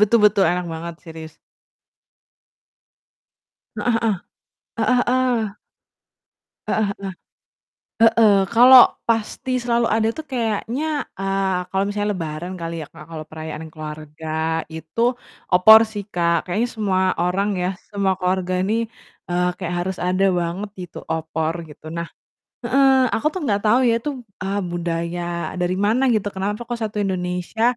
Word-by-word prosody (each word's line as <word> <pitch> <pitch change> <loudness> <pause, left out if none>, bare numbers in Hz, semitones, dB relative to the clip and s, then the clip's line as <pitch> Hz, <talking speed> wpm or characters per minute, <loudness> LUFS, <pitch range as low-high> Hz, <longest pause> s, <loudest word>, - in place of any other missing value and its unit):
betul 210 +3 +5
betul, 205 -1 +5
enak 180 0 -1
banget, 165 +1 -6
serius. 160 -1 -9 2.4
Heeh 245 -2 0
heeh. 225 -2 +2 0.7
Heeh 250 -1 +3
heeh. 245 -5 +1 1.1
Heeh 220 - +1
heeh. 200 -1 -5 0.9
Heeh, 225 -1 +6 0.2
kalau 250 +2 +10 0.3
pasti 225 +3 -1
selalu 235 -1 +1
ada 220 0 +2
tuh 315 0 -7
kayaknya, 235 +2 -1 0.3
eee, 195 -1 0
kalau 190 0 +1
misalnya 205 +1 -1
lebaran 165 0 -5
kali 165 0 -4
ya, - - -7
Kak, 155 - -11
kalau 155 -1 -6
perayaan 155 0 -7
keluarga, 155 +1 -4
itu, 160 +5 -7 0.5
opor 220 +5 +9
sih, 215 -2 -6
Kak, 170 -1 +2
kayaknya 210 +7 0
semua 195 -4 +1 0.2
orang 185 +3 +1
ya, 180 - +1 0.2
semua 200 -2 +1
keluarga 185 0 0
ini, 200 +4 0 0.6
eee, 180 0 +1
kayak 175 -2 -3
harus 185 +1 -2
ada 185 +2 +2 0.2
banget 175 +5 -3
gitu, 175 - -9
opor, 160 0 -1 0.2
gitu. 150 - -14
Nah 170 0 -3 0.6
heeh, 270 -1 +4
aku 225 - -1
tuh 375 - -3
nggak 205 -6 +1
tau 220 +4 +5
ya, 235 -2 +4
tuh, 295 +2 -3 0.3
eee, 195 +2 -1
budaya 170 0 -2 0.4
dari 180 +1 +1
mana 230 +5 +2
gitu, 210 -2 0
kenapa 205 +4 -2
kok 240 0 -4
1 215 -1 -4
Indonesia, 180 +2 -2
190 Hz, 140 wpm, -21 LUFS, 170-220 Hz, 2.4 s, kalau